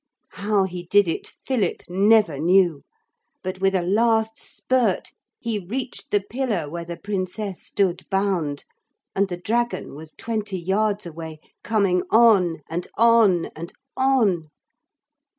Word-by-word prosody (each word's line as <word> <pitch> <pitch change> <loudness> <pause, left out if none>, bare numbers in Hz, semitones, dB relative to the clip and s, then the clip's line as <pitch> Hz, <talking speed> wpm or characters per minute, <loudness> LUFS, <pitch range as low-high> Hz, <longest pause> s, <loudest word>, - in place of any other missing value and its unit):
How 205 -1 +1
he 180 -2 -5
did 205 +1 +4
it 165 - -3
Philip 230 -9 -1
never 195 -4 +3
knew. 175 -2 +3 0.6
But 185 0 -5
with 195 0 +2
a 180 - +1
last 220 +3 +2
spurt 245 -7 -1 0.3
he 230 -3 -2
reached 220 +2 -5
the 205 - +2
pillar 225 - -2
where 170 +3 -5
the 170 0 -7
Princess 195 -1 -4
stood 185 -4 -1
bound. 185 -7 -1 0.5
And 200 +1 +2
the 175 - -4
dragon 235 +6 -1
was 155 +2 -11
twenty 215 -4 -3
yards 200 +3 0
away, 160 -1 -8 0.2
coming 195 -3 +2
on 200 -8 +4
and 175 +2 -4
on 225 -7 +4
and 165 +2 -8 0.2
on. 225 - +2
195 Hz, 135 wpm, -23 LUFS, 175-220 Hz, 0.6 s, did